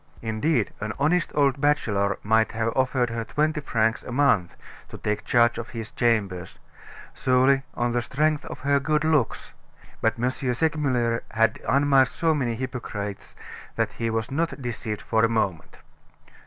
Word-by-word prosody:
Indeed, 115 +2 0
an 110 0 -3
honest 160 +5 +1
old 140 -2 +2
bachelor 105 -9 +1
might 110 +1 +2
have 115 0 -1
offered 130 -2 +1
her 115 0 -3
twenty 150 +5 0
francs 115 -4 0
a - - -9
month 120 -9 +2 0.3
to - - -9
take 105 0 -3
charge 120 -1 +3
of 120 0 -6
his 115 -2 -7
chambers 100 -7 -1 0.6
solely 130 +1 +3
on 120 0 0
the 120 0 0
strength 150 +4 0
of - - -8
her 140 +1 +2
good 150 +1 0
looks. 155 -6 0 0.5
But - - +1
M. 125 +2 +1 0.2
Segmuller 130 -6 0
had 115 -1 +1
unmasked 135 -1 +3
so 165 -3 +2
many 125 -6 -1
hypocrites 110 -5 -6 0.4
that - - 0
he 115 -1 -2
was 110 +2 -2
not 165 +2 -1
deceived 120 -4 -4
for 110 0 +1
a 115 - +4
moment. 100 -7 -2
120 Hz, 155 wpm, -25 LUFS, 110-140 Hz, 0.6 s, a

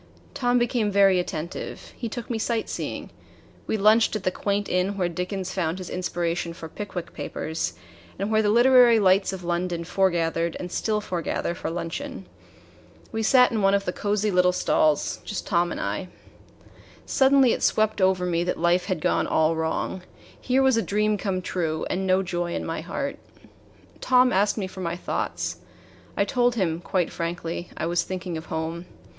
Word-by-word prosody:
Tom 245 -1 +1
became 240 -3 +1
very 195 -2 +5
attentive. 170 -1 -5
He 235 - -4
took 235 +1 -6
me 230 -2 -2
sightseeing. 225 0 -3 0.6
We 220 - 0
lunched 215 +2 +4
at 210 - -3
the 185 - +1
quaint 200 +2 -1
inn 185 +2 0
where 180 -2 +1
Dickens 180 +2 -4
found 170 -2 -1
his 185 -2 -7
inspiration 175 -1 -2
for 165 -1 -8
"Pickwick 180 -1 -6
Papers" 160 +1 -3 0.4
and 200 +3 -2
where 220 0 +4
the 210 - +1
literary 240 +1 +6
lights 190 0 +3
of 190 -2 -7
London 175 0 -1
foregathered 170 -2 0
and 180 -1 -6
still 215 +2 0
foregather 175 -3 -2
for - - -4
luncheon. 190 - -5 0.9
We 225 - -2
sat 250 +3 +5
in 220 -3 0
one 195 0 +4
of 200 0 -1
the 180 - -2
cozy 205 0 0
little 180 0 +4
stalls 155 -4 +1
just 205 - -5
Tom 175 0 +1
and - - -4
I. 185 - -3 1.0
Suddenly 265 -2 +4
it - - -3
swept 215 -1 +2
over 185 -1 +3
me 170 -1 0
that 180 - -2
life 175 +2 +2
had 185 -6 -2
gone - - +1
all 160 +1 +2
wrong. 160 +3 -2 0.4
Here 260 +1 +2
was 265 -3 +4
a - - +3
dream 210 0 +1
come 190 -3 -2
true, 160 -4 -2
and 190 +1 -1
no 185 +1 +3
joy 175 -1 -2
in - - -3
my 165 - -3
heart. 280 - -4 0.8
Tom 250 -1 +4
asked 200 +3 +2
me 200 - -1
for 185 0 -8
my 170 -1 -2
thoughts. 180 - -3 0.6
I - - +3
told 245 -1 +1
him, 170 -6 0
quite 180 -1 -1
frankly, 170 0 -4
I - - -2
was 170 +1 +1
thinking 185 -2 -5
of 160 +1 -6
home. 165 +1 -4
185 Hz, 180 wpm, -25 LUFS, 175-215 Hz, 1.0 s, literary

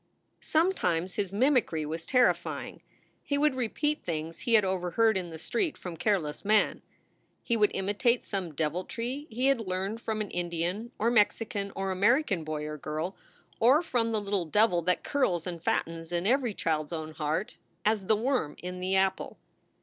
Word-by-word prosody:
Sometimes 190 - +1
his 200 -3 -2
mimicry 225 - +2
was 160 +2 -5
terrifying. 250 -2 +1 0.4
He 285 - -1
would 300 0 +3
repeat 275 +5 -1
things 165 -1 -4
he 235 - +2
had 210 -3 +5
overheard 190 +4 +2
in 180 -2 -2
the 160 - -8
street 325 - -1
from 180 -2 -7
careless 175 -4 0
men; 210 +1 +2 0.6
he 235 - +1
would 210 -2 +4
imitate 205 +5 +1
some 185 -6 -4
deviltry 230 - -3
he 245 +3 -1
had 275 -2 +4
learned 195 +3 -3
from 220 -2 -2
an 210 -2 -3
Indian 175 +6 -2
or 230 +2 +2
Mexican 205 -2 +1
or 195 0 -2
American 205 - +2
boy 155 -1 -3
or 150 0 -5
girl, 155 +6 -3 0.4
or 265 +8 +5
from 235 -7 0
the 220 - +1
little 200 -3 -1
devil 195 +1 +3
that 180 +2 0
curls 185 - 0
and 175 -3 -5
fattens 165 0 -1
in 175 +1 -1
every 245 -2 +2
child 155 -2 0
s 170 - -9
own 160 -1 -4
heart, 155 +9 -2 0.3
as 210 -3 +1
the 220 - +5
worm 230 - 0
in 180 0 -6
the 185 +1 0
apple. 190 0 0
195 Hz, 175 wpm, -29 LUFS, 170-230 Hz, 0.6 s, had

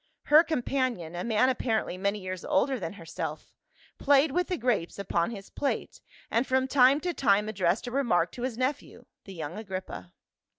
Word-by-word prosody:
Her 305 +2 +7
companion, 250 - -2
a 175 - -3
man 235 +2 +2
apparently 230 -6 -1
many 200 +2 -1
years 185 -2 -6
older 265 -1 +1
than 165 -2 -5
herself, 165 -5 -6 0.5
played 280 +1 +4
with 360 +5 0
the 365 - -2
grapes 230 -8 -1
upon 180 -3 0
his 200 -4 -9
plate, 280 - -3 0.3
and 235 +3 +1
from 260 0 +1
time 265 +1 +5
to 355 +1 -2
time 210 -7 +2
addressed 190 -1 0
a 245 - -5
remark 245 -9 +1
to 245 - -9
his 250 -2 -3
nephew, 260 +3 -3 0.2
the 195 - -9
young 165 +4 -5
Agrippa. 185 - -7
230 Hz, 175 wpm, -28 LUFS, 185-265 Hz, 0.5 s, Her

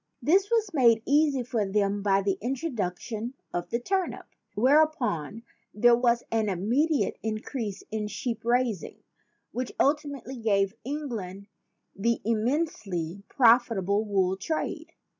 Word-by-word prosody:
This 385 +6 +3
was 445 -5 +1
made 235 -6 +4
easy 285 -2 +3
for 235 -3 -1
them 200 0 0
by 195 -1 +2
the 195 -1 0
introduction 235 - -3 0.2
of 175 0 -3
the 235 - -1
turnip. 380 +7 -2 0.3
Whereupon 240 - +2 0.3
there 240 +3 +6
was 240 -1 +2
an 220 -2 +1
immediate 250 - +1
increase 215 -1 -4
in 215 -1 -2
sheep 225 +1 -4
raising, 235 -4 -1 0.5
which 250 0 -3
ultimately 285 -3 0
gave 200 -3 +1
England 225 -9 -5 0.5
the 230 +4 0
immensely 215 - -1
profitable 225 -5 +3
wool 190 -3 +1
trade. 315 +11 -3
230 Hz, 120 wpm, -27 LUFS, 200-270 Hz, 0.5 s, there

